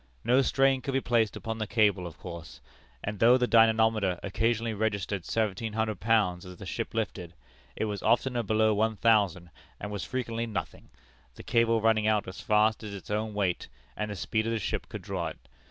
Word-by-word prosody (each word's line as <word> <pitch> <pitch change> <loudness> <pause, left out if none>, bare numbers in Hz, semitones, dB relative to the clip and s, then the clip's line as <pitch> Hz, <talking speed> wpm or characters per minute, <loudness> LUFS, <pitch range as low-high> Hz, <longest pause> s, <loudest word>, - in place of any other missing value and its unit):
No 125 +3 +4
strain 135 0 +2
could 135 -1 -3
be - - +4
placed 115 -4 +1
upon 110 0 -5
the 110 - -2
cable, 105 -5 +2
of 80 - -11
course; 85 -8 -9 0.4
and 100 -1 -4
though 120 +2 +6
the 125 - +2
dynamometer 110 -5 +3
occasionally 115 +3 0
registered 100 -4 -2
seventeen 110 0 -1
hundred 110 -3 -1
pounds 105 -5 +2
as 90 -1 -10
the 95 - -9
ship 115 +4 -4
lifted, 90 -6 -3 0.4
it - - -1
was 105 -2 -4
oftener 120 0 +2
below 110 0 +2
one 110 +1 +1
thousand, 100 -6 +2 0.3
and 105 - -6
was 100 -3 -4
frequently 115 -2 -3
nothing, 90 -8 -6 0.5
the - - -11
cable 115 -1 +2
running 110 -1 +3
out 105 -2 +1
as 95 -1 -8
fast 105 +1 +2
as 105 -2 -6
its 100 - -9
own 105 0 -2
weight 95 -4 -1 0.3
and 105 0 -3
the 105 - -4
speed 110 +5 -1
of 115 - 0
the - - 0
ship 105 - -3
could - - -7
draw - - -3
it. - - -7
110 Hz, 200 wpm, -28 LUFS, 100-115 Hz, 0.5 s, though